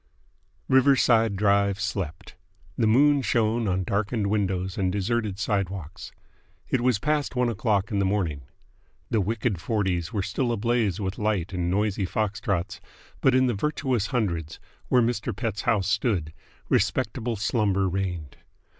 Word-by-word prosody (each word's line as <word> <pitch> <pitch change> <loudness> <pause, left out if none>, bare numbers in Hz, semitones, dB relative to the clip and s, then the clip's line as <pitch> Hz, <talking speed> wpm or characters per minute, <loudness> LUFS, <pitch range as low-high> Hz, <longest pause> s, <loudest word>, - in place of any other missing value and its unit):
Riverside 125 -5 +4
Drive 100 0 +2
slept. 95 -5 -4 0.4
The 115 - +2
moon 140 +5 +5
shone 115 -2 +1
on 95 0 0
darkened 105 +1 -1
windows 95 -2 -1
and 95 -2 0
deserted 105 +1 -1
sidewalks. 100 -6 -3 0.6
It 130 - +1
was 125 -3 +3
past 150 +4 -1
one 125 -1 +2
o'clock 110 -1 0
in 100 - 0
the 100 - +2
morning. 90 -8 -1 0.7
The 110 - +2
wicked 110 -2 -1
Forties 95 -4 -1
were 100 -3 -1
still 125 +4 -1
ablaze 115 -3 0
with 95 -1 -3
light 105 -4 -1
and 90 -1 -1
noisy 100 0 0
foxtrots; 100 -3 -2 0.4
but 130 - +4
in 130 0 +4
the 125 - +1
virtuous 130 -2 -1
Hundreds, 85 - -2 0.3
where 125 -1 +4
Mr. 115 -1 -1
Pett's 110 -5 -3
house 100 -4 +2
stood, 100 -7 0 0.3
respectable 115 0 0
slumber 100 -2 +1
reigned. 90 -5 -3
105 Hz, 140 wpm, -26 LUFS, 95-115 Hz, 0.7 s, moon